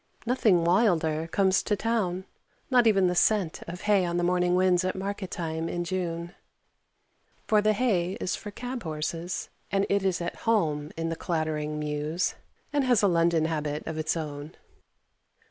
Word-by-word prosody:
Nothing 220 -8 +3
wilder 165 -4 +2
comes 190 +2 +2
to 210 - 0
town 195 -4 -1 0.5
not 245 -2 +5
even 195 -4 +4
the 180 - +2
scent 185 -2 +2
of 180 +2 -7
hay 205 -2 +3
on 175 0 -1
morning 180 0 +2
winds 185 -1 +3
at 185 - -1
market 195 0 -4
time 160 -1 -3
in 175 - -2
June; 175 -1 -3 1.1
for 215 -1 +3
the 215 +1 +3
hay 195 -6 +1
is 185 - -2
for 210 - -8
cab 245 +4 -5
horses, 165 +2 -4 0.2
and 195 0 +2
it 200 0 +2
is 190 -2 +1
at 170 0 -4
home 155 -9 +1
in 165 0 -2
the 165 - -2
clattering 155 -3 -2
mews, 150 +3 -1 0.4
and 290 -1 +2
has 245 -5 +3
a - - +6
London 170 -2 +3
habit 150 -2 -2
of 160 -1 -4
its 155 +2 0
own. 150 0 -6
175 Hz, 165 wpm, -27 LUFS, 160-200 Hz, 1.1 s, a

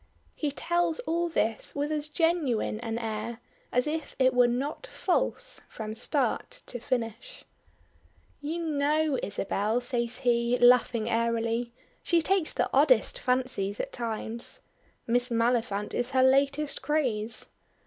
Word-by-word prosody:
'" - - -40
He 300 - -1
tells 345 +3 0
all 340 -6 -1
this 225 -8 -1
with 290 +1 -1
as 300 -1 -1
genuine 305 -10 0
an 225 -1 -3
air 225 0 -4 0.3
as 250 0 +2
if 310 0 -3
it 260 -1 +4
was 245 -1 +5
not 280 - -3
false - - -1
from 215 -1 -6
start 310 - -1
to 245 - -5
finish. 235 - -4 1.0
"You 330 +3 -3
know 300 -1 +1
Isabel," 205 +3 -1
says 245 -1 -2
he, 240 -1 +2
laughing 245 -2 +4
airily; 230 +1 0 0.3
"she 340 - +3
takes 365 0 +1
the - - 0
oddest - - +4
fancies 250 - -1
at - - -4
times. 230 0 -3 0.4
Miss 245 +2 +1
Maliphant 230 -3 0
is 245 0 -1
her 260 -1 +4
latest 275 +2 +2
craze. 235 -8 0
250 Hz, 135 wpm, -28 LUFS, 230-300 Hz, 1.0 s, was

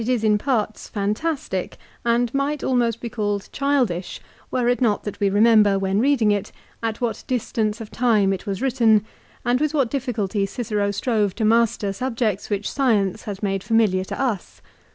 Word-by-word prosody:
is 245 -3 +1
in 215 -1 +4
parts 220 -4 -1
fantastic, 210 - -2 0.3
and 235 0 +1
might 280 +1 -1
almost 235 -3 +1
be 235 - -5
called 205 -3 -2
childish 255 -11 0 0.3
were 245 -2 0
it 245 +1 +1
not 220 -4 +2
that 210 - -6
we 200 - +2
remember, 210 -1 +5
when 195 +1 0
reading 245 -4 +3
it, 205 0 -1 0.3
at 225 -1 -2
what 230 -3 -2
distance 225 -3 -1
of 220 -2 -8
time 215 -5 +2
it 190 - -6
was 200 +4 -3
written, 230 -5 +3 0.4
and 245 +2 +2
with 305 0 0
what 270 -6 +1
difficulty 225 -7 -1
Cicero 210 -2 -2
strove 205 -1 0
to 220 - -1
master 220 -3 +2
subjects 230 -3 -2
which 205 -1 -1
science 215 -8 +1
has 205 -1 -6
made 195 -1 0
fami 225 -2 +2
liar 185 0 0
to - - -5
tts. 235 -9 -3
220 Hz, 175 wpm, -22 LUFS, 205-245 Hz, 0.4 s, remember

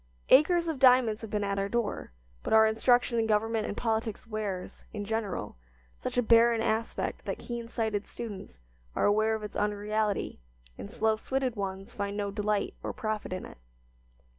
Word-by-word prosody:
Acres 335 +5 +5
of 315 -5 -2
diamonds 250 -4 +5
have 225 - -7
been 210 0 -1
at 200 0 -1
our 195 0 -1
door, 235 - -2 0.3
but - - -2
our 220 0 +8
instruction 235 +2 +3
in 225 - +1
government 220 +1 +1
and 205 - -5
politics 225 -2 -1
wears, 210 -4 -5
in 205 -2 -5
general, 205 - -3 0.4
such - - -4
a 245 - +4
barren 230 0 +5
aspect 225 0 -1
that - - -3
keen 235 -2 -6
sighted 220 -3 -2
students 205 - -8 0.4
are - - +2
aware 215 +2 +3
of 220 - -6
its 210 - -7
unreality 210 - -1 0.4
and, 200 - -8
slow 220 -2 +1
switted 260 +1 -1
ones 195 -1 -5
find 200 0 -3
no 200 -1 -2
delight 210 0 -1
or - - -4
profit 215 -4 -3
in 185 - -4
it. - - -13
220 Hz, 175 wpm, -29 LUFS, 205-230 Hz, 0.4 s, our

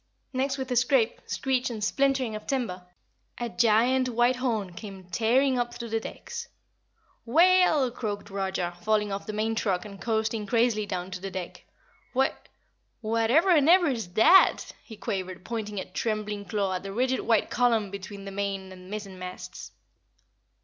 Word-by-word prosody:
Next 270 +1 0
with 260 -1 -5
a - - +1
scrape, 245 -1 +2
screech 260 -2 0
and 220 -3 -5
splintering 265 -1 +1
of 215 - -8
timber, 195 -10 -2 0.5
a 240 -1 -2
giant 240 +4 +3
white 240 +1 +2
horn 220 -8 -1
came 195 0 -9
tearing 245 +9 +2
up 240 0 -2
through 235 -1 -6
the 225 0 0
decks. 470 - -7 0.8
"Whale! 345 +4 +5
Whale!" 255 -2 0
croaked 210 -4 -5
Roger, 190 -3 -2
falling 210 +1 +1
off 195 0 -4
the - - -2
main 220 +1 0
truck 195 -5 -1
and 200 -2 -10
coasting 220 -2 -1
crazily 225 -1 +2
down 185 -1 -4
to 185 -1 -6
the 195 - -4
deck. 185 -2 -7 0.5
"Wha 265 +1 +4 0.7
what 225 0 0
ever'n 320 +1 +5
ever's 300 - +4
that?" 360 +13 +6
he 220 - -11
quavered, 185 -2 -4
pointing 210 -3 -4
a - - -4
trembling 210 0 -3
claw 195 0 -1
at 180 - -2
the 195 - -6
rigid 255 +5 +1
white 225 -2 +1
column 230 -5 +2
between 200 0 -8
the 195 - -6
main 195 -1 -3
and 185 0 -12
mizzenmasts. 190 -3 -7
220 Hz, 165 wpm, -27 LUFS, 195-250 Hz, 0.8 s, that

